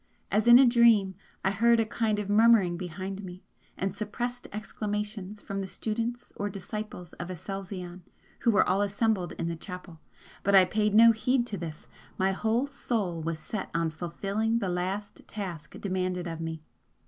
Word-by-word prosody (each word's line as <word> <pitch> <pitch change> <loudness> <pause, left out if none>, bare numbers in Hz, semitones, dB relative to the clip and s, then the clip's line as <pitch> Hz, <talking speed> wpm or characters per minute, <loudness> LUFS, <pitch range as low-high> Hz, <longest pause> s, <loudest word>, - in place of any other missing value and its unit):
As 215 +2 +2
in 240 0 +10
a 265 - +7
dream 235 -5 +5 0.3
I 190 - +3
heard 230 +4 +4
a 225 - +3
kind 215 -1 0
of 210 -1 -3
murmuring 210 -4 +5
behind 185 +3 -5
me 180 0 -9 0.3
and 190 0 -1
suppressed 240 +4 -4
exclamations 210 -1 -4
from 195 0 -3
the 190 - -4
students 230 +4 -3
or 205 - -2
disciples 200 -2 -6
of 175 - -5
Aselzion 185 0 -6 0.4
who - - +2
were 210 -2 +4
all 190 +2 +2
assembled 205 -2 0
in 165 - -3
the 170 - -2
chapel 180 -1 -9 0.4
but 200 0 +3
I 190 -1 +8
paid 210 +2 +1
no 230 +1 +9
heed 240 +3 +1
to 215 -4 -5
this 160 -2 -7 0.3
my 190 +1 +2
whole 225 +6 +1
soul 215 - -2
was 165 0 -2
set 200 +5 -5
on 165 -1 +1
fulfilling 195 +7 -1
the 200 -5 -1
last 185 +3 -3
task 175 -8 -6
demanded 185 -2 -2
of 165 -1 -5
me. 160 -1 -5
200 Hz, 170 wpm, -28 LUFS, 180-220 Hz, 0.4 s, in